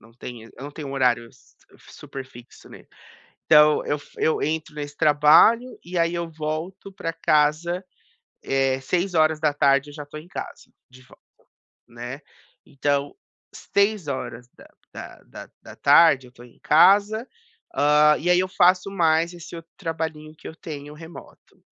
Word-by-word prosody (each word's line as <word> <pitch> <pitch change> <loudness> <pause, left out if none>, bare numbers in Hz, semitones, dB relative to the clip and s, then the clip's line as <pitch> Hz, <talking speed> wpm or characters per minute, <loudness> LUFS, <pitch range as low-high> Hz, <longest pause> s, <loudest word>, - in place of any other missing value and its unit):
não 110 +1 -20
tenho 115 -1 -10
eu 130 - -10
não 145 - -7
tenho 145 -1 -8
um - - -6
horário 125 -3 +1
s - - -25 0.3
super 135 -1 -9
fixo, 120 -2 -16
né, - - -14 0.6
então 150 -1 +5
eu 145 - -1
f 145 - -18
eu 160 - 0
entro 155 0 -3
nesse 145 -1 -7
trabalho, 155 +12 +4
e 175 +1 -6
aí 170 0 +1
eu 170 -1 -4
volto 160 +5 -6
pra 165 -3 -4
casa, 155 +5 +1 0.6
eh, 135 -1 0
18h 155 -4 +1
eu - - -12
já 145 -1 -8
tô 145 +1 -10
em 155 +3 -11
casa - - -9 0.2
de 130 0 -17
volta, - - -21 0.7
né, 120 +4 -8 0.5
então, 140 0 -2 0.4
18h 200 -4 -1
horas 125 -3 -6
da - - -16 0.3
da - - -10
da - - -12
da - - -13
tarde 140 -6 +5
eu 125 - -18
tô 120 - -16
em 120 - -19
casa, 205 - +4 0.5
hã, 150 +1 +4
e 175 - -3
aí 180 - +5
eu 185 +1 0
faço 185 +1 +2
mais 165 -2 +1
esse 170 0 -10
outro 165 0 -12
trabalhinho 160 -3 -5
que - - -14
eu - - -10
tenho 150 -3 -9
remoto, 165 +2 -14
155 Hz, 165 wpm, -23 LUFS, 140-170 Hz, 0.7 s, então